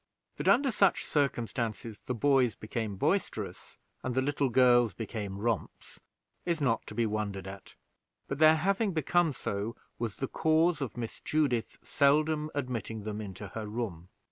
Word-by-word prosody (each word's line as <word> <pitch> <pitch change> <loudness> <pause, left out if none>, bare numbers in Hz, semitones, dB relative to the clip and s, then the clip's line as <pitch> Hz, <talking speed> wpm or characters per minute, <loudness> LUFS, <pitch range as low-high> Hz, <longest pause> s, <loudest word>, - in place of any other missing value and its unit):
That, - - -3
under 270 +1 +5
such 200 -4 +3
circumstances, 115 -6 -1
the 125 - -3
boys 130 -2 +3
became 110 -1 -4
boisterous 160 - -2 0.2
and 125 -1 -3
the 130 - +3
little 140 -1 +1
girls 120 -5 +5
became 105 -3 -5
romps, 110 -3 -3 0.4
is 170 -2 0
not 125 -6 0
to 105 - -7
be 115 0 +2
wondered 105 -3 -2
at: 95 0 -10 0.5
but 135 - -4
their 155 0 +7
having 195 +5 +1
become 165 +2 +2
so 105 -3 -3 0.2
was 115 -4 -2
the 135 - -2
cause 160 +1 +2
of 130 -3 -4
Miss 115 -2 -5
Judith 140 -7 0
seldom 150 +1 +2
admitting 115 -6 -3
them 105 0 -4
into 100 -1 -7
her 110 +2 -5
room. 105 -6 -4
120 Hz, 155 wpm, -30 LUFS, 110-150 Hz, 0.5 s, their